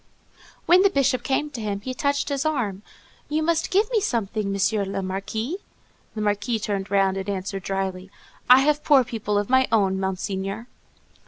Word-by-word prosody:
When 360 +2 +6
the 395 - +5
Bishop 275 -6 +1
came 290 +4 -1
to 245 -5 -6
him, 200 -2 -3
he 255 +4 -4
touched 280 +2 -1
his 280 -1 -1
arm, 240 -11 -1 0.5
"You 310 +1 0
must 335 0 +1
give 410 +3 +3
me 445 -3 +2
something, 220 - -1
M. 200 0 0
le 195 - -3
Marquis." 220 - -3 0.6
The 215 - -3
Marquis 210 +3 0
turned 200 -2 -3
round 195 -1 +2
and 195 +1 -4
answered 195 0 -3
dryly, 190 -1 -3 0.4
_"I 255 +1 +9
have 295 +1 +1
poor 280 -3 +5
people 215 -3 -2
of 205 0 0
my 260 0 +3
own, 195 -4 +2
Monseigneur." 195 +3 -3
215 Hz, 175 wpm, -24 LUFS, 195-275 Hz, 0.6 s, I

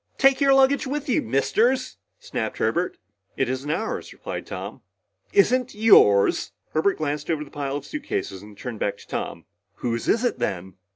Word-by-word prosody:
"Take 270 +1 +4
your 275 -1 +5
luggage 270 +1 +4
with 295 +2 -3
you, 255 - +2
Misters!" 230 - +1 0.2
snapped - - -4
Herbert. - - 0 0.4
"It 135 - +1
isn't 130 +3 -3
ours," 220 +9 -2
replied - - -7
Tom. - - -7 0.5
"Isn't 255 - +3
yours?" 150 - +5 0.2
Herbert 160 +6 +2
glanced 150 -1 -3
over 155 -2 0
the 145 - -14
pile 140 -1 -3
of 145 -1 -5
suitcases 210 - -4
and 105 0 -13
turned 120 -2 -6
back 100 - -1
to - - -16
Tom. - - -4 0.3
"Whose 115 -1 -3
is 230 - +2
it 245 - -1
then?" 95 0 -3
155 Hz, 170 wpm, -24 LUFS, -, 0.5 s, your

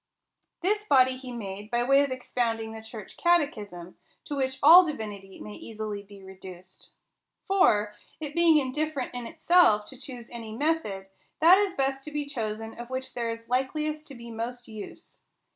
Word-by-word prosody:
This 415 +4 +1
body 260 -9 +4
he 255 -1 -9
made, 205 -3 -6
by 240 +1 +1
way 275 +3 +5
of 285 - -2
expounding 235 -3 -2
the 220 0 -8
church 220 -2 -10
catechism; 215 - 0 0.3
to 290 - -4
which 265 -1 -1
all 340 +5 +10
divinity 210 - -6
may 210 - -8
easily 215 -2 -6
be 200 -1 -15
reduced. 185 -1 -12 0.6
For, 215 - +3 0.3
it 300 -2 -5
being 335 -1 +5
indifferent 285 0 -2
in 245 -1 -5
itself 230 -14 +4
to 265 - -10
choose 245 -3 -9
any 230 -2 -7
method, 285 -11 -1 0.3
that 350 +4 +7
is 400 -2 0
best 270 -2 -1
to 300 - -7
be 295 0 -2
chosen 225 -5 -4
of 240 0 -7
which 260 0 -4
there 235 -1 -2
is 230 0 -6
likeliest 305 +5 -1
to 275 - -9
be 235 -1 -10
most 240 +2 -5
use. 215 -2 -10
245 Hz, 170 wpm, -27 LUFS, 215-295 Hz, 0.6 s, all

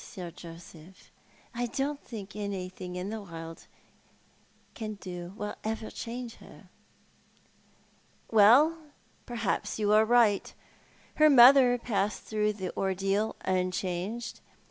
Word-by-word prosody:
Sir 180 -7 -8
Joseph. 170 +1 -13 0.4
I 240 +1 -2
don't 280 +4 -3
think 210 -4 -9
anything 185 -3 -5
the 220 +1 -5
world 165 -3 -9 1.1
can 215 -2 -5
do 180 -3 -8
will 210 0 -4
ever 220 0 -4
change 240 0 -6
her." - - -16 0.8
" - - -33
Well, 250 +10 +6 0.5
perhaps 230 -5 -2
you 210 -1 +2
are 215 +1 +6
right. 225 -3 +3 0.6
Her 310 0 +6
mother 250 -1 +8
passed 210 -4 -2
through 210 -1 0
the 190 -3 -6
ordeal 195 +3 0
unchanged. 185 +4 -2
210 Hz, 110 wpm, -29 LUFS, 185-235 Hz, 1.1 s, mother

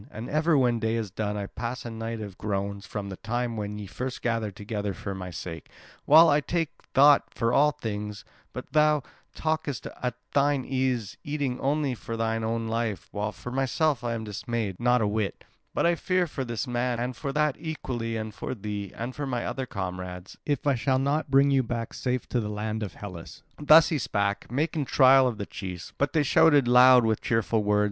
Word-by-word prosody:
And 110 +3 -7
ever 155 +1 +3
when 120 -3 +2
day 110 0 0
is 110 -4 -3
done 105 +1 -2
I 100 - -3
pass 120 +5 -5
a 120 - -5
night 115 0 -5
of 100 -3 -7
groans 100 -1 -3
from 100 -1 -5
the 95 - -7
time 120 +1 -2
when 105 -1 -4
ye 105 - -6
first 125 +6 -5
gathered 115 -4 -1
together 105 -2 -4
for 100 - -5
my 95 -1 -6
sake, 85 -1 -7 0.4
while 160 +3 +8
I 150 -1 +4
take 165 +1 -1 0.3
thought 145 +1 +6
for 115 0 +1
all 145 +3 +5
things; 105 -7 -5 0.3
but - - -8
thou 150 -2 +4 0.3
talkest 155 -6 -2 0.2
at 125 -2 -1 0.2
thine 140 -1 +2
ease, 130 -5 -1
eating 145 -4 -2
only 140 -1 0
for 115 -1 -6
thine 115 0 -1
own 115 0 -1
life; 110 -7 -2
while 105 +1 -2
for 105 +5 -8
myself 135 +1 +1
I 120 -1 -1
am 110 - -4
dismayed 105 -1 -3
not 125 0 +3
a - - +2
whit; 105 -1 -2 0.3
but - - 0
I 170 - +4
fear 185 +1 +1
for 140 -4 -4
this 120 0 -3
man 120 -1 -1
and 125 +1 -2
for 140 - -4
that 150 -1 +2
equally, 125 -8 -4
and 110 -1 -5
for 130 - -5
thee, 105 -2 -5
and 120 +3 -5
for 145 -1 -3
my 125 -2 -2
other 130 -1 -3
comrades, 90 -2 -6
if 145 -2 -1
I 140 - +4
shall 130 +2 +1
not 140 +3 0
bring 140 +1 +5
you 135 -1 +4
back 115 -2 -4
safe 125 -1 -2
to 125 - +1
the 105 -2 -3
land 105 +1 -3
of 100 -5 -5
Hellas." 90 -5 -9 0.2
Thus 155 +2 +7
he 155 - 0
spake, 100 -2 -1
making 150 +2 0
trial 130 0 +6
of 120 -4 -3
the 100 - -4
chiefs; 90 -3 -7
but 140 0 +1
they 155 -2 +3
shouted 145 -1 +5
loud 125 0 +7
with 110 -1 +1
cheerful 115 -1 +1
words. 105 0 +2
120 Hz, 210 wpm, -27 LUFS, 105-135 Hz, 0.4 s, while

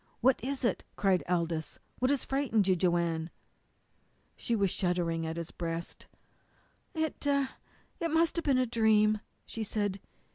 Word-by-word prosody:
"What 255 -2 +3
is 270 +1 -2
it?" 235 - +1
cried 190 -3 +2
Aldous. 170 -3 -1 0.2
"What 255 - +2
has 280 -2 +1
frightened 260 -7 +1
you, 185 - +4
Joanne?" 170 -2 +1 1.1
She 235 - -1
was 200 -4 +2
shuddering 175 -3 0
against 160 +1 -4
his 170 -1 -4
breast. 165 -1 -5 0.9
"It 315 -1 -2
it 280 +4 -2
must 325 +1 +3
have 335 - -1
been 275 -3 +4
a 255 - +3
dream," 215 -2 +3 0.3
she 225 - -4
said. 205 -2 -1
210 Hz, 145 wpm, -31 LUFS, 170-260 Hz, 1.1 s, you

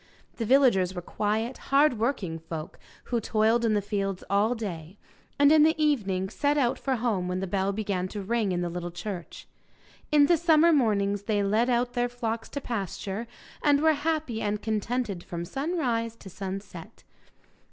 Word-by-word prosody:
The 230 - -2
villagers 235 -9 +4
were 180 - -4
quiet, 220 +6 -2
hard 275 -4 +4
working 215 -9 -1
folk, 160 0 -7 0.2
who 235 -2 -1
toiled 220 +2 +2
in 220 -2 +2
the 205 - 0
fields 195 -2 -2
all 210 +5 +3
day, 185 -5 -6 0.4
and 285 0 +6
in 310 -1 +6
the 320 +1 +4
evening 200 -12 +1
set 285 +8 0
out 255 -2 +1
for 265 -2 0
home 220 -7 -1
when 180 0 -2
the 190 - -2
bell 195 +1 0
began 195 -3 -2
to 205 +1 -6
ring 220 -1 0
in 175 -1 -1
the 175 - -2
little 175 0 -4
church. 175 0 -7 0.6
In 295 -1 +6
the 340 +3 +4
summer 330 0 +5
mornings 205 -7 +2
they 205 -2 +1
led 220 +5 +2
out 245 0 +1
their 245 -1 0
flocks 230 -2 -4
to 285 - -4
pasture, 205 -1 -4 0.3
and 290 -1 +4
were 315 +1 +4
happy 300 -6 -2
and 210 0 -1
contented 220 -2 -2
from 170 0 -5
sunrise 245 - -2
to 195 -4 -12
sunset. 195 0 -7
220 Hz, 175 wpm, -27 LUFS, 195-255 Hz, 0.6 s, and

